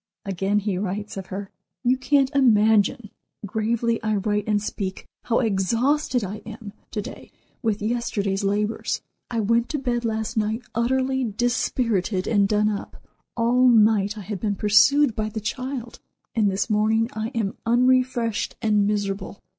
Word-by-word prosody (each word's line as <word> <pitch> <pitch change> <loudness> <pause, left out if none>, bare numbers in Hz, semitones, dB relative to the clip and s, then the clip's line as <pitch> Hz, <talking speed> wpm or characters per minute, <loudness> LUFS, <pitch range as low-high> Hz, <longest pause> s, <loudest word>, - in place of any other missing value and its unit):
Again 195 +1 0
he 200 -3 -1
writes 205 +1 -4
of 190 -1 -6
her: 195 +1 -6 0.3
"You 250 +1 +3
can't 270 +1 +2
imagine 220 -4 +3 0.3
(gravely 225 +3 0
I 215 -1 0
write 210 +1 -1
and 210 -1 +2
speak) 195 -2 -5 0.2
how 235 - +2
exhausted 235 +5 +1
I 200 +2 -4
am 220 -2 -10 0.2
to 210 - -3
day - - -10 0.3
with 215 -2 -1
yesterday's 210 -4 -1
labors. 210 +2 -1 0.3
I 230 -2 -1
went 230 +3 +1
to 305 - -1
bed 245 -3 -1
last 220 0 -2
night 220 +3 0
utterly 260 +3 +1
dispirited 225 -4 0
and 205 -3 +3
done 210 0 +2
up. 205 -1 -5 0.4
All 245 +2 +4
night 215 -3 +4
I - - -6
have 200 0 -5
been 205 0 -1
pursued 225 +6 +4
by 215 0 -1
the 220 - -4
child; 250 +2 -5 0.3
and 215 -3 +2
this 195 +1 -1
morning 220 +1 +2
I 220 0 -3
am 215 -4 -1
unrefreshed 250 -2 +2
and 210 -2 +2
miserable. 200 -1 -2
220 Hz, 155 wpm, -24 LUFS, 205-240 Hz, 0.4 s, All